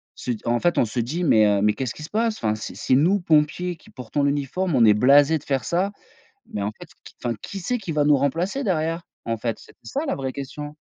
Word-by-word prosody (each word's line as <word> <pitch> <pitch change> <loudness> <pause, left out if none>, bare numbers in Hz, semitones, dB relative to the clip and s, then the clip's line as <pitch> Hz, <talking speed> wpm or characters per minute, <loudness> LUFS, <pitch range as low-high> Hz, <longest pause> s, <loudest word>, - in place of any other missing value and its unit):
se 125 - -4
d 110 - -4
en 120 +1 +1
fait, 175 +4 +1
on - - +5
se 115 +3 -4
dit: 145 +10 -2
«Mais 110 -9 +5
heu, 100 -1 +2
mais 105 +1 +3
qu'est-ce 130 -1 -3
qu'il 155 - -8
se - - -12
passe? 225 +1 +1
Enfin, 110 -1 0
c'est 110 - -7
si 130 - +1
nous, 180 +8 +3
pompiers 165 +2 +1
qui - - -20
portons 130 +3 -3
l'uniforme. 145 +5 0
On 120 - +5
est 105 - +7
blasés 140 +7 +5
de - - -19
faire 135 -2 0
ça, 185 +4 0 0.6
mais 105 - -2
en 100 - -1
fait, - - -10
qui, - - -13
enfin, 120 -1 -1
qui 195 - -6
c'est 245 +7 -1
qui 195 -7 -6
va 150 -1 +2
nous 145 -1 +5
remplacer 170 - -1
derrière, 165 -4 -1 0.2
en 115 0 -1
fait?» 115 0 -3
C'est - - -17
ça, 275 - -4
la - - 0
vraie 135 -1 -4
question. 145 +2 -7
145 Hz, 260 wpm, -23 LUFS, 120-175 Hz, 0.6 s, est